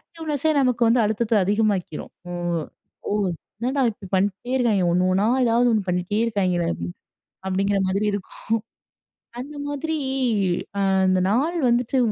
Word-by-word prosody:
ஆக்டிவ்னெஸ்ஸே 315 -2 -2
நமக்கு 250 -2 +1
வந்து 240 +2 +4
அழுத்தத்த 220 +2 -1
அதிகமாக்கிரும். 205 -4 0 0.2
ஓ - - -4 0.8
ஓ - - -2 0.5
"என்னடா 265 +3 0
இப்படி 200 -2 -11
பண்ணிக்ட்டே 200 +6 0
இருக்காய்ங்க. 215 -7 +2
ஒண்ணு 180 +1 +2
ஒண்ணா 200 +3 +2 0.2
ஏதாவது 240 +1 +3
ஒண்ணு 215 -2 +2
பண்ணிட்டே 180 +4 0
இருக்காய்ங்களே!" 185 -6 0 0.8
அப்டிங்கிற 195 +1 +1
மாதிரி 200 +3 0
இருக்கும். 200 -2 -6 1.0
அந்த 290 +3 -8
மாதிரி 315 +3 -2 0.8
அ - - +1 0.3
இந்த 185 0 +3
நாள் 295 +11 +1
வந்துட்டு 245 +2 +1
215 Hz, 130 wpm, -23 LUFS, 195-250 Hz, 1.0 s, வந்து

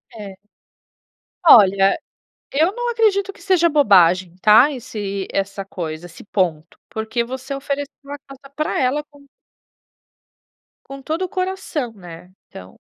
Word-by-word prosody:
É. 200 -3 -9 1.1
Olha, 195 - +6 0.5
eu 320 +7 +2
não 485 0 -3
acredito 400 -4 +1
que - - -19
seja 365 -3 +3
bobagem, 185 - +4
tá 220 +8 +6
esse 210 -7 -5
essa 195 0 -3
coisa, 165 -3 -6
esse 165 -1 -13
ponto, 170 -6 -2
porque 220 +1 -3
você 260 +3 -6
ofereceu 280 +1 -4 0.2
a 290 - -5
casa 275 0 -16
pra 305 0 -2
ela 270 +3 0
com 285 -1 -19 1.6
Com 275 0 -10
todo 320 +6 -3
o 370 - -3
coração, 370 -10 -3
né. 175 -3 -12 0.2
Então 90 0 -12
250 Hz, 130 wpm, -20 LUFS, 195-295 Hz, 1.6 s, Olha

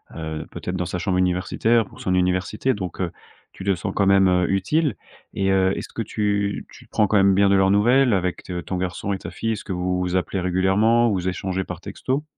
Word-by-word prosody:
heu, 80 -1 -5
peut-être 90 - -5
dans 90 -1 -1
sa 90 - -3
chambre 95 0 0
universitaire, 95 +5 +1
pour - - -16
son 95 - 0
université 90 +7 +1
donc 95 -4 -6
heu, 90 -2 -1 0.4
tu - - -9
te 100 -1 +2
sens 85 - -4
quand 100 - +2
même, 95 0 +5
heu, 90 -1 +2
utile 125 - +1 0.4
et 95 -1 0
heu, 95 0 +3
est-ce - - -6
que - - -3
tu 100 -2 -1
tu - - -15
prends 105 - +2
quand 105 - +2
même 95 0 +5
bien 100 0 +4
de 100 - +4
leurs 95 0 +4
nouvelles 120 +5 +4
avec 90 -2 -1
t 90 -1 -5
ton 95 - -4
garçon 90 +2 -3
et - - -2
ta 85 -2 -8
fille? 115 +5 -2
Est-ce 110 - -6
que 95 - -3
vous 90 0 -1
vous 90 0 -1
appelez 95 +1 -2
régulièrement? 95 +6 +3
Vous 95 -3 -1
échangez 95 +1 -3
par 90 -2 -7
texto? 135 +8 -3
95 Hz, 235 wpm, -23 LUFS, 90-105 Hz, 0.4 s, même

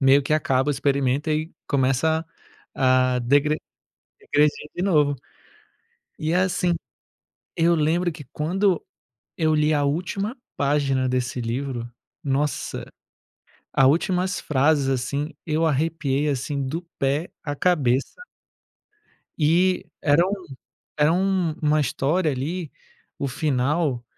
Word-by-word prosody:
meio 135 +1 +5
que 140 - -2
acaba 135 -2 +1
o - - +4
experimento, 140 +1 0
e 155 +2 -1 0.2
começa 140 +4 +1 0.5
a 130 -2 +3
degre 145 +5 +3 0.6
degredir 150 0 +1
de 175 - -3
novo. 150 -7 +3 1.0
E, 155 +1 -1
é, - - +3
assim, 180 -1 +1 0.8
eu 170 +1 +4
lembro 170 +3 +1
que 155 -3 -10
quando 180 +4 +1 0.5
eu 155 -1 +2
li 150 0 +3
a 145 - +1
última 185 - -2 0.2
página 140 -2 +1
desse 125 0 -1
livro, 120 0 -3 0.3
nossa, 140 +1 -1 0.9
a 135 - +4
últimas 180 +5 +1
frases, 145 0 +2
assim, 140 +4 -1
eu 160 +1 +1
arrepiei, 150 -1 0
assim, 140 0 -2
do 160 +6 -3 0.2
pé 140 +5 0
à 145 - -2
cabeça 145 - +1 1.2
e 175 +4 +3 0.2
era 155 +4 +4
um 195 - -2 0.7
era 150 +2 +5
uma 170 -5 +1
história 155 +4 +1
ali, 155 +5 -4 0.5
o 140 - -1
final, 140 -1 0
150 Hz, 115 wpm, -24 LUFS, 135-165 Hz, 1.2 s, meio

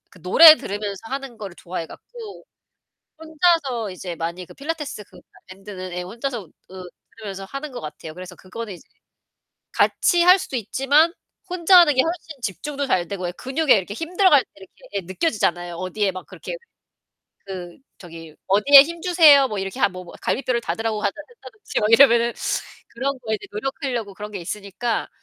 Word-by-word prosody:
그 185 - -18
노래 310 - +9
들으면서 205 -1 -5
하는 270 -2 -6
거를 195 -4 -8
좋아해 170 -1 -6
갖고 455 - -12 0.7
혼자서 315 - 0
이제 180 -1 -7
많이 170 +3 -5
그 - - -15
필라테스 295 -6 -5
그 - - -17 0.3
밴드는 185 -1 -9
예 180 - -3
혼자서 230 +2 -5 0.2
그 185 0 -10 0.3
들으면서 195 -3 -7
하는 275 +7 -7
것 250 - -7
같아요. 155 +1 -9
그래서 180 +1 -10
그거는 205 +4 -8
이제 175 - -15 0.8
같이할 360 +2 +4
수도 275 - -6
있지만 270 - +2 0.4
혼자 360 +1 +5
하는 305 -5 +5
게 260 - +5
훨씬 325 -3 -5
집중도 280 +7 -4
잘 175 -7 0
되고 185 -2 -4
예 175 - -3
근육에 270 - +1
이렇게 195 +1 -4
힘 330 +8 -7
들어갈 355 -9 +5
때 - - -36
이렇게 190 -1 -15 0.2
예 200 - -1
느껴지잖아요. 180 - -2
어디에 185 +3 -2
막 185 0 -9
그렇게 - - -8 0.9
그 180 -3 -8 0.2
저기 165 -3 -12
어디에 240 +9 +8
힘주세요. 330 -3 +5
뭐 210 -3 -4
이렇게 195 +5 -5
하 - - +3
뭐, 185 -1 -9
뭐 175 - -13
갈비뼈를 255 -2 -1
닫으라고 225 -1 -3
한다 200 -2 0
한다든지 445 -3 -7
뭐 210 - +1
이러면은 235 0 +5 0.6
그런 270 +3 -3
거에 220 -1 -1
이제 - - -12
노력하려고 240 -2 -4
그런 210 +2 -8
게 195 - -6
있으니까 205 +5 -4
225 Hz, 380 characters per minute, -22 LUFS, 185-285 Hz, 0.9 s, 노래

